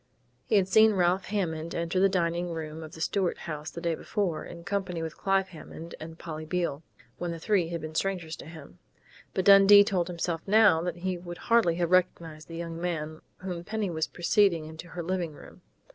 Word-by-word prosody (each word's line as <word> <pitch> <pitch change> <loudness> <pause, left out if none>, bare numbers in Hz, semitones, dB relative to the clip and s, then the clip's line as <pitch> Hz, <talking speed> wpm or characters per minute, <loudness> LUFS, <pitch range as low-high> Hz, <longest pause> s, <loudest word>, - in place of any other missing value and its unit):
He - - +2
had 195 -2 +4
seen 220 +3 +6
Ralph 180 +1 +2
Hammond 170 -5 -2
enter 170 +2 -1
the 195 +1 +5
dining 175 -1 0
room 160 -1 -5
of 160 0 -9
the 160 - -9
Stuart 185 +1 0
House 155 -1 -6
the 170 - -8
day 170 -1 0
before, 175 0 -2
in 170 -1 -10
company 190 -3 -2
with 160 -1 -5
Clive 195 -1 +1
Hammond 165 0 -10
and 160 +1 -9
Polly 160 -2 -6
Beale, 155 -3 -2 0.4
when 175 - -3
the 170 - -4
three 180 0 +1
had 170 -1 -4
been 155 0 -6
strangers 175 -2 -2
to - - -10
him; 155 - -12 0.6
but 190 - 0
Dundee 200 0 +9
told 185 -4 0
himself 170 -2 -3
now 205 -5 +5
that 175 -1 -3
he 180 0 -3
would 175 0 -8
hardly 230 -7 +3
have 170 0 -1
recognized 170 -4 +1
the 165 - -8
young 165 0 -5
man 155 -3 -3 0.2
whom 180 -2 -5
Penny 215 -1 -2
was 160 -1 -1
preceding 175 -2 +2
into 160 +2 -9
her 175 +1 -6
living 175 -2 -2
room. - - -14
170 Hz, 205 wpm, -28 LUFS, 160-190 Hz, 0.6 s, Dundee